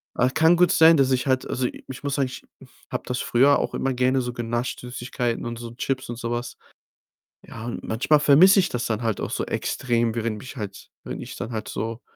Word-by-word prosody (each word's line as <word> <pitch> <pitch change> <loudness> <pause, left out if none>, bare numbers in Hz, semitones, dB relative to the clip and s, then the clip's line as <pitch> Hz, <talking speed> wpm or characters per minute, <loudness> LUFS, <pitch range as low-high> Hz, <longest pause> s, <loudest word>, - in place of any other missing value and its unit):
Ach, 125 +1 +2
kann 160 +2 +5
gut 180 0 +4
sein, 160 -1 +7
dass 135 -2 +3
ich 130 -1 +1
halt 130 -1 +1
also, 125 0 0 0.2
ich 135 +1 -9
muss 140 -1 -1
sagen, 140 -2 +1
ich 130 - -9 0.5
habe - - -2
das 125 0 -2
früher 140 +4 +4
auch - - -2
immer 135 - -1
gerne 130 +1 +2
so 125 0 -4
genascht, 120 +1 -3
Süßigkeiten 125 -1 -3
und 120 0 -5
so 120 0 -8
Chips 130 +1 -3
und 120 - -5
so 115 - -4
was. 120 +1 -4 0.9
Ja, 115 0 -8
und 120 - -5
manchmal 135 +7 +2
vermisse 165 +8 +7
ich 180 -2 +2
das 120 - -3
dann 110 -1 -2
halt 115 -3 -1
auch - - -4
so - - -2
extrem, 120 -3 -1
während 115 -1 -2
mich 130 +5 -10
halt 100 -3 -7
wenn - - -6
ich - - -8
dann 115 - -5
halt 110 -2 -4
so 115 +2 -4
125 Hz, 225 wpm, -24 LUFS, 115-135 Hz, 0.9 s, sein